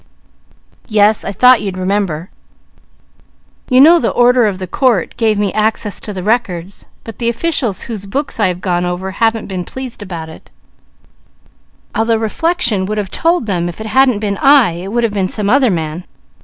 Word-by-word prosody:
Yes. 210 Hz, -1 st, +3 dB
I -, -, -4 dB
thought 250 Hz, +5 st, +5 dB
you'd 195 Hz, -2 st, -4 dB
remember. 185 Hz, -3 st, -2 dB, 1.4 s
You 255 Hz, -1 st, +4 dB
know 330 Hz, +5 st, +7 dB
the -, -, 0 dB
order 245 Hz, -1 st, +3 dB
of 195 Hz, -3 st, -2 dB
the 185 Hz, -, -5 dB
court 225 Hz, -, 0 dB
gave 220 Hz, -3 st, +1 dB
me 205 Hz, -2 st, -1 dB
access 215 Hz, -1 st, -1 dB
to 210 Hz, -, -7 dB
the 185 Hz, -3 st, -6 dB
records, 200 Hz, -5 st, -2 dB, 0.2 s
but 225 Hz, -, -10 dB
the 235 Hz, -1 st, 0 dB
officials 235 Hz, -, -2 dB
whose 210 Hz, -4 st, -7 dB
books 275 Hz, +5 st, -3 dB
I 210 Hz, -, +3 dB
have 180 Hz, 0 st, -3 dB
gone 175 Hz, -2 st, -1 dB
over 180 Hz, +2 st, -3 dB
haven't 225 Hz, +2 st, 0 dB
been 185 Hz, -2 st, -4 dB
pleased 255 Hz, +4 st, -8 dB
about 170 Hz, -5 st, -6 dB
it, 160 Hz, -, -14 dB, 1.4 s
although 225 Hz, +1 st, +1 dB
reflection 225 Hz, -, 0 dB
would 215 Hz, +1 st, -3 dB
have 200 Hz, -3 st, -3 dB
told 335 Hz, -5 st, +1 dB
them 175 Hz, -4 st, -1 dB
if 175 Hz, -, -10 dB
it 220 Hz, -, -6 dB
hadn't 255 Hz, +1 st, +3 dB
been 200 Hz, -2 st, -2 dB
I, 275 Hz, -8 st, +5 dB
it 175 Hz, +4 st, -7 dB
would 240 Hz, +1 st, 0 dB
have 225 Hz, -3 st, 0 dB
been 190 Hz, -2 st, -1 dB
some 210 Hz, -1 st, -1 dB
other 265 Hz, -1 st, +4 dB
man. 165 Hz, -1 st, -3 dB
210 Hz, 185 wpm, -15 LUFS, 185-240 Hz, 1.4 s, know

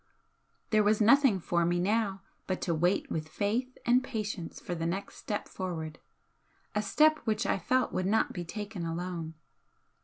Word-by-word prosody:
There 215 Hz, -1 st, +5 dB
was 210 Hz, +1 st, +3 dB
nothing 235 Hz, -1 st, +5 dB
for 170 Hz, 0 st, +1 dB
me 175 Hz, +1 st, +1 dB
now 195 Hz, 0 st, 0 dB, 0.2 s
but 185 Hz, -, -1 dB
to 170 Hz, -, 0 dB
wait 175 Hz, +5 st, +1 dB
with 155 Hz, -1 st, -3 dB
faith 230 Hz, +9 st, -1 dB
and 245 Hz, +2 st, +4 dB
patience 210 Hz, -8 st, -4 dB
for 180 Hz, -, -5 dB
the 165 Hz, -1 st, -2 dB
next 190 Hz, +4 st, -4 dB
step 205 Hz, -, -3 dB
forward 165 Hz, -4 st, -5 dB, 0.7 s
a 210 Hz, -, +1 dB
step 310 Hz, +8 st, +4 dB
which 220 Hz, -2 st, -1 dB
I -, -, +1 dB
felt 255 Hz, +8 st, +1 dB
would 185 Hz, -, 0 dB
not 220 Hz, +3 st, +2 dB
be 175 Hz, -, -4 dB
taken 205 Hz, +1 st, -5 dB
alone. 165 Hz, -1 st, -4 dB
195 Hz, 165 wpm, -30 LUFS, 175-220 Hz, 0.7 s, There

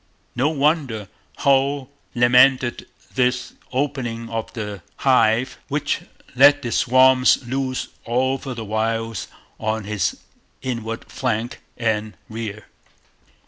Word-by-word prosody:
No 130 Hz, +5 st, +2 dB
wonder 140 Hz, -, 0 dB, 0.3 s
Hull 140 Hz, 0 st, +2 dB, 0.2 s
lamented 125 Hz, +1 st, +4 dB, 0.3 s
this 125 Hz, -1 st, 0 dB, 0.2 s
'opening 120 Hz, -4 st, -2 dB
of 115 Hz, -1 st, -3 dB
the 105 Hz, -4 st, -5 dB
hive,' 120 Hz, -2 st, +2 dB
which -, -, -1 dB, 0.3 s
'let 145 Hz, +2 st, +6 dB
the 120 Hz, -, -3 dB
swarms' 130 Hz, +1 st, +4 dB
loose 130 Hz, +1 st, -2 dB
all 130 Hz, +3 st, +1 dB
over 135 Hz, -1 st, -5 dB
the 115 Hz, -2 st, -6 dB
wilds 115 Hz, 0 st, -2 dB, 0.3 s
on 110 Hz, 0 st, -1 dB
his 105 Hz, 0 st, -1 dB, 0.5 s
inland 115 Hz, -2 st, -4 dB
flank 120 Hz, -2 st, -2 dB, 0.2 s
and 110 Hz, -2 st, -1 dB
rear. 110 Hz, -2 st, -6 dB
120 Hz, 105 wpm, -22 LUFS, 110-130 Hz, 0.5 s, let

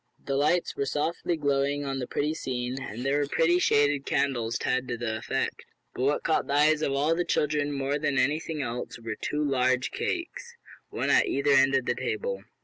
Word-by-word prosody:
The 140 Hz, -, -2 dB
lights 150 Hz, +5 st, +1 dB
were 140 Hz, -, -1 dB
softly 165 Hz, +4 st, -1 dB
glowing 140 Hz, -1 st, 0 dB
on 135 Hz, -1 st, -2 dB
the 125 Hz, -, -4 dB
pretty 150 Hz, +2 st, -1 dB
scene, 130 Hz, -3 st, -3 dB
and 120 Hz, +2 st, -6 dB
there 140 Hz, +2 st, +2 dB
were 145 Hz, -, 0 dB
prettily 170 Hz, +4 st, +3 dB
shaded 145 Hz, -4 st, +3 dB
candles 120 Hz, -6 st, 0 dB
to -, -, -4 dB
add 130 Hz, 0 st, 0 dB
to 120 Hz, -, -3 dB
the 115 Hz, -2 st, -2 dB
effect. 135 Hz, +4 st, -3 dB, 0.3 s
But -, -, -5 dB
what 140 Hz, +3 st, +1 dB
caught 160 Hz, -, +1 dB
the -, -, -2 dB
eyes 150 Hz, +1 st, +4 dB
of 140 Hz, -, 0 dB
all 145 Hz, +4 st, +2 dB
the 175 Hz, +2 st, 0 dB
children 150 Hz, -3 st, 0 dB
more 140 Hz, +1 st, -1 dB
than 145 Hz, -2 st, 0 dB
anything 150 Hz, +3 st, 0 dB
else 120 Hz, 0 st, -5 dB
were 115 Hz, -1 st, -4 dB
two 150 Hz, +6 st, -2 dB
large 130 Hz, -1 st, +1 dB
cakes 380 Hz, +7 st, -4 dB, 0.3 s
one -, -, -1 dB
at -, -, +4 dB
either 140 Hz, +1 st, +1 dB
end 135 Hz, 0 st, +5 dB
of 130 Hz, -2 st, +1 dB
the -, -, +1 dB
table. 470 Hz, +3 st, -3 dB
140 Hz, 210 wpm, -27 LUFS, 130-150 Hz, 0.3 s, end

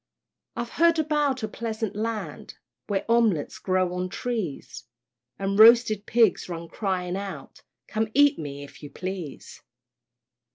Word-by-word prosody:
I've 235 Hz, 0 st, -4 dB
heard 335 Hz, 0 st, +5 dB
about 295 Hz, -5 st, 0 dB
a -, -, 0 dB
pleasant 220 Hz, -1 st, -4 dB
Land, 220 Hz, +1 st, -4 dB, 0.3 s
Where 200 Hz, -2 st, -1 dB
omelettes 230 Hz, -10 st, +2 dB
grow 185 Hz, -1 st, 0 dB
on 180 Hz, 0 st, -3 dB
trees, 215 Hz, -, -4 dB, 0.5 s
And 195 Hz, +1 st, -1 dB
roasted 220 Hz, -2 st, +6 dB
pigs 225 Hz, -5 st, +3 dB
run 170 Hz, -1 st, -6 dB
crying 185 Hz, -3 st, -2 dB
out, 195 Hz, 0 st, -7 dB, 0.3 s
"Come 220 Hz, +1 st, -1 dB
eat 285 Hz, -5 st, +5 dB
me, 145 Hz, -2 st, -6 dB
if 140 Hz, -, -13 dB
you 145 Hz, -, -8 dB
please." 185 Hz, -1 st, -7 dB
210 Hz, 130 wpm, -25 LUFS, 180-235 Hz, 0.5 s, roasted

